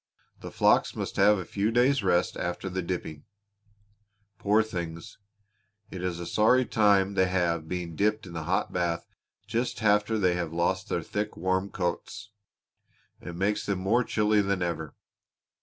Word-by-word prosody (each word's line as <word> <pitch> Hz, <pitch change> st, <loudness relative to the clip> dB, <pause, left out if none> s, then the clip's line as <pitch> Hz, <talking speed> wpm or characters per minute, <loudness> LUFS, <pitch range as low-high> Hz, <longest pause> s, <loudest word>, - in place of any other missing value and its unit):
The -, -, -8 dB
flocks -, -, +2 dB
must -, -, -4 dB
have 105 Hz, +2 st, +5 dB
a 90 Hz, -, -5 dB
few 100 Hz, +2 st, -1 dB
days' 125 Hz, +3 st, +3 dB
rest 90 Hz, -2 st, +1 dB
after 90 Hz, +2 st, -4 dB
the 95 Hz, +1 st, -2 dB
dipping. 85 Hz, -4 st, -5 dB, 1.2 s
Poor 105 Hz, +2 st, +3 dB
things! 85 Hz, -6 st, -6 dB, 0.7 s
It 90 Hz, -1 st, -6 dB
is 90 Hz, -2 st, -2 dB
a 85 Hz, -, -5 dB
sorry 125 Hz, +7 st, +3 dB
time 100 Hz, -3 st, +3 dB
they 95 Hz, -1 st, +3 dB
have 85 Hz, -3 st, 0 dB
being 90 Hz, -2 st, -4 dB
dipped 105 Hz, +2 st, 0 dB
in 90 Hz, -, -10 dB
that 80 Hz, -2 st, -5 dB
hot 95 Hz, +5 st, -1 dB
bath 85 Hz, -2 st, -1 dB, 0.4 s
just 115 Hz, +1 st, -2 dB
after 105 Hz, +1 st, +3 dB
they 90 Hz, -4 st, +2 dB
have 85 Hz, -2 st, -3 dB
lost 85 Hz, +1 st, -1 dB
their -, -, -1 dB
thick, 105 Hz, +1 st, -4 dB
warm 95 Hz, +2 st, 0 dB
coats; 90 Hz, +3 st, -4 dB, 0.9 s
it 85 Hz, -, -8 dB
makes 100 Hz, +4 st, 0 dB
them 100 Hz, -2 st, 0 dB
more 105 Hz, +7 st, +2 dB
chilly 105 Hz, -2 st, +2 dB
than 100 Hz, -2 st, -1 dB
ever. 80 Hz, -3 st, -4 dB
95 Hz, 160 wpm, -27 LUFS, 85-105 Hz, 1.2 s, have